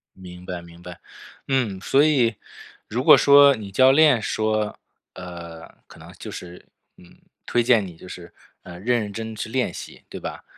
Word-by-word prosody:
明 90 -1 -12
白 90 -1 -6
明 85 0 -16
白。 90 0 -11 0.5
嗯， 125 -8 -1
所 135 +7 +3
以 130 -7 +2 0.5
如 - - -3
果 - - +8
说 140 0 +6
你 105 -4 -9
教 130 +6 +5
练 145 -4 +4
说， 110 -1 -2 0.3
呃， 85 -2 -10 0.2
可 - - -16
能 - - -13
就 - - -10
是， 90 0 -10 0.3
嗯， 90 - -19 0.3
推 120 - 0
荐 115 -4 +3
你 90 -3 -11
就 90 - -14
是， 90 -1 -11 0.3
呃， 85 -1 -11
认 120 +4 0
认 105 -1 -6
真 110 +1 -6
去 110 - -6
练 125 +2 -2
习， - - -11
对 - - -8
吧？ - - -8
105 Hz, 195 characters per minute, -22 LUFS, 90-125 Hz, 0.5 s, 果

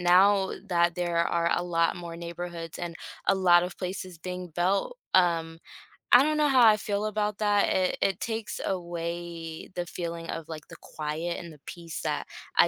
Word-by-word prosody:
now 190 +2 +5
that 170 -2 +2
there 175 -1 0
are 170 0 +1
a - - 0
lot 170 -1 +1
more 170 -1 -7
neighborhoods 170 -1 -6
and 170 -2 -5 0.3
a 195 - +5
lot 175 -2 +6
of 180 0 -5
places 185 -2 -5
being 180 +1 -5
built, 195 - 0 0.2
um, 165 -2 +3 0.5
I 245 - +9
don't 305 0 +1
know 300 -1 +4
how 255 -3 +6
I 215 -1 +6
feel 205 0 -2
about 210 -1 -1
that, 205 -1 +3
it 185 -1 +1
it 195 -2 +1
takes 220 -2 -3
away 170 -2 -4
the 175 -1 -2
feeling 170 -1 -5
of 160 - -4
like 155 -2 -8
the - - -10
quiet 155 +3 -4
and 170 -1 -8
the 150 - -16
peace 170 -2 -7
that 150 -2 -2 0.3
I - - +7
175 Hz, 185 wpm, -28 LUFS, 170-195 Hz, 0.5 s, I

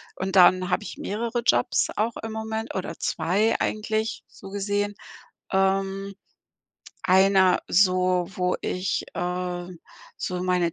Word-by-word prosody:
und 190 +1 -3
dann 185 0 +6
habe 185 +4 0
ich - - -8
mehrere 230 +3 -2
Jobs - - +3
auch 225 +2 0
im 225 - -4
Moment 220 +1 -4
oder 180 -3 -4
2 210 +6 +1
eigentlich 215 +1 -2
so 195 - -12
gesehen. 205 +1 -2 0.6
Ähm. 195 +1 0 0.9
Einer 190 0 +5
so, 185 -1 +3
wo 180 0 0
ich, 185 +1 -1
äh, 180 0 -3 0.5
so 180 0 -3
meine 180 -2 +1
190 Hz, 125 wpm, -25 LUFS, 180-210 Hz, 0.9 s, dann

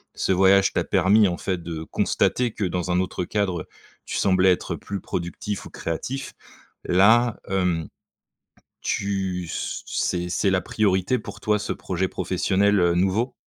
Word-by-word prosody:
ce - - 0
voyage 95 +1 +4
t'a - - +1
permis, 100 +3 +4
en 85 - -2
fait, 90 -2 -3
de 80 -1 -5
constater 125 +8 0
que, 105 - -5
dans 90 -1 -2
un 90 0 +2
autre 90 -1 -2
cadre, 95 -3 -1
heu, - - -9 0.4
tu - - -5
semblais 95 -1 +4
être 90 - -1
plus 100 -1 -6
productif 90 +4 -4
ou - - -9
créatif. 125 +12 -4 0.5
Là, 110 +6 +4
hem, 90 -5 0 0.9
tu 95 -3 -2
c - - -4
c'est 90 -1 -1
c'est 95 +2 +1
la 95 -1 +2
priorité 95 +5 +1
pour - - -9
toi, 105 0 +1
ce - - -3
projet 95 0 -2
professionnel, 95 +3 +1
heu, 85 -1 +3
nouveau? 95 +8 +1
95 Hz, 160 wpm, -24 LUFS, 90-100 Hz, 0.9 s, voyage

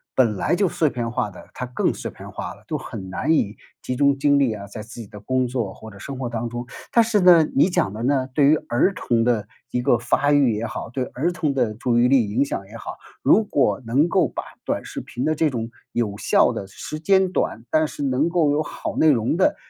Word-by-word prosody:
本 115 -5 +3
来 135 - +1
就 195 +2 +2
碎 160 -2 +1
片 120 -3 -3
化 110 - -1
的， 95 - -13
它 125 - -4
更 125 - 0
碎 - - -6
片 - - -11
化 - - -6
了， - - -19
都 - - -2
很 95 -1 -8
难 125 +11 -1
以 110 -9 +1 0.3
集 125 - -3
中 140 0 +3
精 145 +1 +3
力 130 -5 +2
啊， 100 -2 -7
在 105 +2 -8
自 115 +2 -11
己 110 - -9
的 105 - -11
工 130 +5 0
作 120 -6 -3
或 110 - -11
者 100 - -13
生 135 +6 -7
活 130 -2 -3
当 120 0 -3
中。 120 +1 -5 0.3
但 235 - +5
是 225 -2 +1
呢， 175 -3 +7
你 140 - +5
讲 135 - 0
的 110 +2 -5
呢， 130 0 +1
对 140 +1 +4
于 150 +3 +6
儿 130 +11 +2
童 120 -10 0
的 115 -3 +1 0.2
一 125 - 0
个 120 - +3
发 125 +5 +1
育 140 -5 +4
也 105 +2 -2
好， - - -5
对 130 +2 -2
儿 155 +9 -2
童 155 -5 -1
的 120 -5 0
注 120 +2 0
意 120 - +5
力 125 -6 +3
影 120 +7 +2
响 100 -8 -4
也 110 - -13
好， 115 - -7 0.3
如 220 - +5
果 140 -9 +1
能 135 +9 +2
够 - - +3
把 - - -5 0.2
短 - - -2
视 - - -6
频 120 - -6
的 155 - +2
这 155 0 +2
种 115 -4 -4 0.2
有 105 -4 -1
效 - - +3
的 95 - -5
时 155 +10 -7
间 190 +2 +3
短， 115 -10 -1
但 155 0 +3
是 145 - -6
能 135 +3 +1
够 170 -4 +2
有 145 +1 +1
好 - - -5
内 160 - +5
容 125 +2 +2
的， 300 +10 +3
130 Hz, 270 characters per minute, -22 LUFS, 115-150 Hz, 0.3 s, 呢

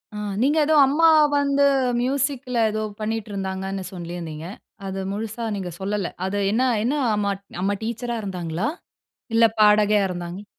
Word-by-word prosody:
ஆ. - - -4 0.2
நீங்க 290 +4 +3
எதோ 310 0 +3
அம்மா 325 +4 +4 0.3
வந்து 280 0 +3 0.4
மியூசிக்ல 265 -1 -1
எதோ 215 0 -2 0.2
பண்ணிட்ருந்தாங்கன்னு 195 -3 -3
சொல்லீருந்தீங்க. 170 -3 -6 0.4
அது 195 0 -4
முழுசா 220 +3 -4
நீங்க 185 -3 -4
சொல்லல. 200 -1 -2 0.2
அது 200 +2 -2
என்ன 245 +4 +2 0.2
என்ன 265 +5 +1 0.2
அம்மா 200 -1 0 0.3
அம்மா 200 +1 +1
டீச்சரா 235 +1 -3
இருந்தாங்களா? 180 - -3 0.7
இல்ல 230 0 +5 0.2
பாடகியா 210 0 +5
இருந்தாங்களா? 175 +2 -6
210 Hz, 130 wpm, -23 LUFS, 190-245 Hz, 0.7 s, இல்ல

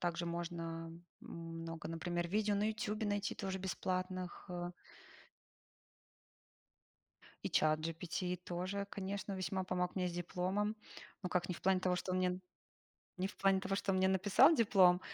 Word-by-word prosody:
Также 170 0 -1
можно 165 -1 -4 0.3
много, 165 -1 -6
например, 170 +1 -2
видео 210 +1 +2
на 205 +1 +2
"Ютубе" 215 0 -1
найти 205 0 0
тоже 190 -1 -3
бесплатных, 185 -1 -2
э. 175 0 -3 2.7
И - - 0
чат 155 0 +3
GPT 165 +3 -2
тоже, 185 +3 -3
конечно, 200 0 -3
весьма 190 0 -1
помог 180 0 -1
мне 185 -1 +1
с - - -5
дипломом. 185 +5 -1 0.5
Ну, 180 - -1
как, 180 0 +1
не 180 - -2
в - - -12
плане 190 0 +4
того, 180 -1 +2
что 185 - -2
он 185 - +1
мне 180 0 +1 0.8
не 185 +1 0
в - - -11
плане 195 -1 +4
того, 195 0 -1
что 195 -1 0
он - - +2
мне 190 - +4
написал 205 - +6
диплом. 195 - +6
185 Hz, 155 wpm, -37 LUFS, 175-195 Hz, 2.7 s, написал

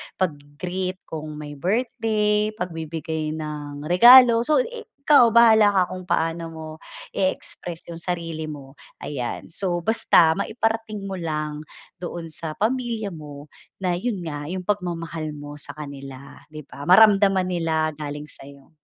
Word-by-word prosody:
pag-gi-greet 180 +3 -4
kung 155 -1 -7
may 150 -1 -7
birthday, 210 - 0
pagbibigay 160 -3 -4
ng 150 -2 -6
regalo. 235 +8 +8
So 305 - +2
i 475 -1 -9 0.2
kaw 250 -6 +7
bahala 220 -3 +7
ka 190 -2 +3
kung 185 0 -6
paano 165 0 0
mo 160 -1 -8 0.4
i-express 180 -2 -3
yung 165 - -7
sarili 165 -2 -4
mo. 140 -3 -9 0.3
Ayan, 125 -5 -4
so 175 -1 -2
basta 210 -6 +4
maiparating 220 0 -2
mo 195 -1 -4
lang 155 -2 -3 0.4
doon 175 -1 -6
sa 155 0 -5
pamilya 230 -1 -1
mo 150 -3 -10 0.4
na 180 -1 +1
yun 225 -1 -2
nga 145 -3 -5
yung 185 0 -4
pagmamahal 170 -5 -3
mo 145 0 -9
sa 145 0 -9
kanila, 140 -1 -9
'di 155 0 -8
ba? 140 +1 -10
Maramdaman 195 -1 +5
nila 160 -2 0
galing 150 0 -6
sa'yo. 140 +1 -14
170 Hz, 135 wpm, -23 LUFS, 150-205 Hz, 0.4 s, regalo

